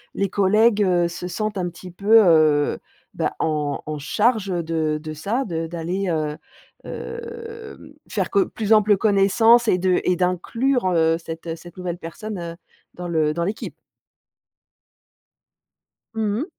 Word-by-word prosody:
les 200 0 0
collègues, 210 +3 +3
heu, 175 -3 +2
se 175 +1 -6
sentent 215 +3 -3
un 175 -1 -1
petit 180 +1 -11
peu, 210 +5 +5
heu, 155 -3 +4 0.4
bah, - - -1
en 150 -3 -1
en 155 0 -4
charge 215 - +1 0.2
de 160 -2 -1
de 155 0 -6
ça, 205 - -2
de 165 -3 -3
d'aller, 175 +4 -3
heu 155 -2 -1 0.5
heu, 460 -1 -8
faire - - -1
co 390 -2 +3
plus 220 0 +1
ample 210 -1 +5
connaissance 220 +4 +4
et 180 - +4
de 185 0 +2
et 180 - +2
d'inclure, 190 +8 0
heu, 165 -1 +3
cette, 165 0 -8
heu, 165 - -3
cette 175 +1 -14
nouvelle 180 -1 -4
personne, 195 +5 -7
heu, 170 -1 -6 0.4
dans 180 0 -6
le 155 -3 +1
dans 170 +2 -2
l'équipe. 200 +5 -4 2.4
Mmh 215 -2 0
mh. 295 - -2
180 Hz, 150 wpm, -22 LUFS, 165-215 Hz, 2.4 s, peu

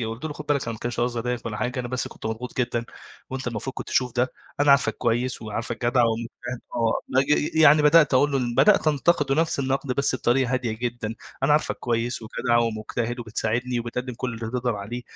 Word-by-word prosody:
إيه، 115 - -1
قُلت 115 +7 -6
له: 155 - -3
"خُد 150 0 -9
بالك 145 -2 +1
أنا 115 - -3
ما 110 - -8
كانش 120 0 -3
قصدي 120 0 0
أضايقك 125 0 -3
ولا 105 -2 -3
حاجة، 125 +2 -2
أنا 120 - -5
بس 125 0 -2
كنت - - -8
مضغوط 115 +4 -5
جدًا 120 -1 0 0.5
وأنت 130 0 -5
المفروض 120 +3 -4
كنت - - -7
تشوف 125 -2 +1
ده، 125 +1 +1 0.3
أنا 145 0 +5
عارفك 135 -6 +4
كويس 120 +1 -1
وعارفك 115 +3 -4
جدع 120 +1 +3
ومجتهد." 115 +2 -3
آه. 115 -1 +1
نج 135 +2 +2
ي 150 +1 +2
يعني 150 0 +7
بدأت 150 -1 +6
أقول 145 +3 +4
له 135 - +2
إن 120 -2 -2
بدأت 200 - +5
أنتًقدُه 145 -1 +2
نفس 160 -1 +1
النُقد 135 -1 -1
بس 140 0 +1
بطريقة 130 0 +1
هادية 130 -3 0
جدًا. 115 -1 -4 0.3
"أنا 135 +2 +4
عارفك 150 - +1
كويس 120 0 -1
وجدع 120 +2 0
ومجتهد 115 +1 -2
وبتساعدني 120 +2 -1
وبتقدِّم 125 +2 -4
كل 125 0 -4
اللي 115 0 -5
تقدر 125 -2 -1
عليه، 110 +5 -6
125 Hz, 220 wpm, -24 LUFS, 115-135 Hz, 0.5 s, يعني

